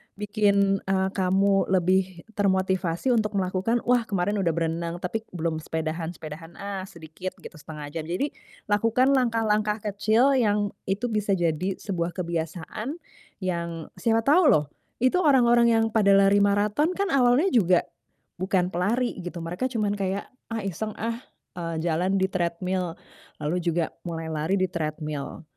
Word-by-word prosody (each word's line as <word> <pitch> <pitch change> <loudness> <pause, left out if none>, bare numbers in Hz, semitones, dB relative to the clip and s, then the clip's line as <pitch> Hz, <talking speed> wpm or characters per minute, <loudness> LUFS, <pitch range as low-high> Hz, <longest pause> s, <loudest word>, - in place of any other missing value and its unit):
bikin, 200 -1 +2
eee, 190 0 0
kamu 195 +1 +2
lebih 185 -1 +1
termotivasi 190 0 +1
untuk 215 -3 +1
melakukan, 190 +5 0
"Wah 245 -1 +2
kemarin 200 +1 0
udah 170 -5 +1
berenang 170 0 -2
tapi 180 +5 -1 0.2
belum 160 -1 -1
sepedahan, 160 +2 -3
sepedahan 165 +2 -9
ah 200 -1 -5
sedikit 170 +1 -8
gitu, - - -10
1/2 150 -1 -8
jam." 155 0 -5
Jadi, 185 - -1 0.4
lakukan 230 +5 +3
langkah-langkah 220 -4 +1
kecil 215 +5 +3
yang 205 -3 +1 0.2
itu 205 +5 -1
bisa 210 -2 +1
jadi 175 +2 0
sebuah 175 -3 -3
kebiasaan 170 - -4 0.5
yang 170 -3 -3
siapa 225 -1 +2
tahu 305 +6 +5
loh, 150 - +4 0.4
itu 255 +8 +4
orang-orang 240 -7 +5
yang 225 0 +2
pada 200 -3 +4
lari 195 +1 +5
maraton 210 - +2
kan 400 0 -1
awalnya 270 +7 +4
juga 185 - +4 0.6
bukan 185 -1 +1
pelari, 215 +7 0
gitu, 175 -1 -6
Mereka 180 +9 -2
cuman 210 -4 0
kayak, 195 +1 -2 0.2
"Ah 225 -3 -2
iseng 205 +3 -3
ah, 230 +2 -2 0.4
eee, 165 -1 -3
jalan 175 +3 +1
di 190 - +2
treadmill." 180 0 -1 0.5
Lalu 155 +4 0
juga 170 -1 0 0.2
mulai 165 -1 -4
lari 160 +5 0
di 185 - +2
treadmill, 155 -4 -4
190 Hz, 145 wpm, -26 LUFS, 170-215 Hz, 0.6 s, tahu